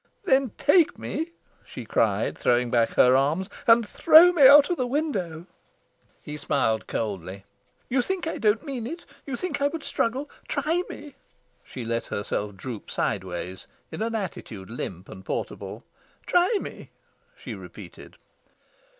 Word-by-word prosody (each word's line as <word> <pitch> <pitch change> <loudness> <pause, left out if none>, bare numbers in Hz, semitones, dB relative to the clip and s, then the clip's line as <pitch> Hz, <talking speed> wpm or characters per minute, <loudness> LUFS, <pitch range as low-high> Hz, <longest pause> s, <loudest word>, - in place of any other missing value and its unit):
"Then 270 -7 +3
take 315 +3 +4
me," 325 +2 -4 0.3
she - - -9
cried, - - +1
throwing 120 0 +1
back 115 -2 +2
her 125 +1 +6
arms, 155 +9 +1 0.2
"and 230 -1 +6
throw 335 +7 +7
me 295 -7 +7
out 290 +3 +8
of 350 - 0
the 255 - -1
window." 195 - -2 0.8
He 150 -1 -6
smiled 110 -6 0
coldly. 100 -3 -4 0.4
"You 255 +1 +1
think 375 +5 -3
I 325 - -3
don't 215 +5 +2
mean 255 -6 -4
it? 335 +5 -7 0.2
You 270 - -3
think 360 +2 -4
I 285 - +4
would 315 +1 -5
struggle? 280 0 -1 0.2
Try 335 +3 0
me." 290 -1 -9 0.5
She 125 -3 -8
let 115 0 -2
herself 100 0 -3
droop 110 +2 -8
sideways, 90 0 -3 0.2
in - - -6
an 225 +1 -1
attitude 115 - -6
limp 95 -5 -6
and 95 - -11
portable. - - -5 0.4
"Try 360 +5 +3
me," - - -9 0.5
she - - -7
repeated. - - -11
225 Hz, 150 wpm, -25 LUFS, -, 0.8 s, out